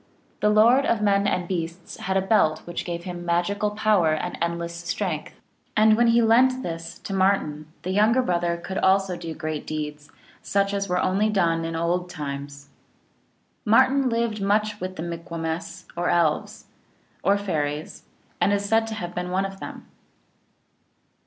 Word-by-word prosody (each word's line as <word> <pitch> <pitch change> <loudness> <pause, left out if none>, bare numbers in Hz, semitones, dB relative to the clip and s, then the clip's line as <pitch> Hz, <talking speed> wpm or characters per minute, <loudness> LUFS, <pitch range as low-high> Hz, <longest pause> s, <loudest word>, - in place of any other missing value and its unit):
The 210 - +3
Lord 230 +6 +5
of 220 -2 +1
men 200 -1 +3
and 180 -3 0
beasts 170 -1 -4
had 190 +1 -1
a 190 - +1
belt 190 -6 +2
which 175 - -5
gave 170 -1 -4
him 175 -1 -6
magical 175 +5 0
power 205 -6 +2
and 180 +3 -4
endless 170 0 -2
strength. 170 -1 -4 0.4
And 215 0 +6
when 240 +1 +3
he 230 0 +4
lent 255 +3 +4
this 165 0 -6
to 195 - -7
Martin, 185 -6 +1 0.2
the 185 - -2
younger 220 +6 +3
brother 175 -4 0
could 190 +3 -4
also 190 -1 +3
do 165 -2 -6
great 155 -1 -4
deeds, 150 -1 -5 0.3
such 200 0 0
as 200 -1 -2
were 180 - +1
only 195 +4 +2
done 170 -5 +1
in 165 0 -3
old 175 +2 -1
times. 140 -2 -6 1.0
Martin 260 +5 +4
lived 230 -2 -1
much 210 +1 +1
with 185 0 -4
the 160 - -5
Mikumwess 165 -1 -5
or 175 +1 0
Elves, 175 +6 0 0.6
or 200 +1 +3
Fairies, 155 -6 -3 0.4
and - - +4
is 200 0 0
said 225 +2 +2
to 220 - -4
have 175 -4 -5
been 180 0 -3
one 190 +2 0
of 195 0 -7
them. - - -8
185 Hz, 165 wpm, -24 LUFS, 170-210 Hz, 1.0 s, And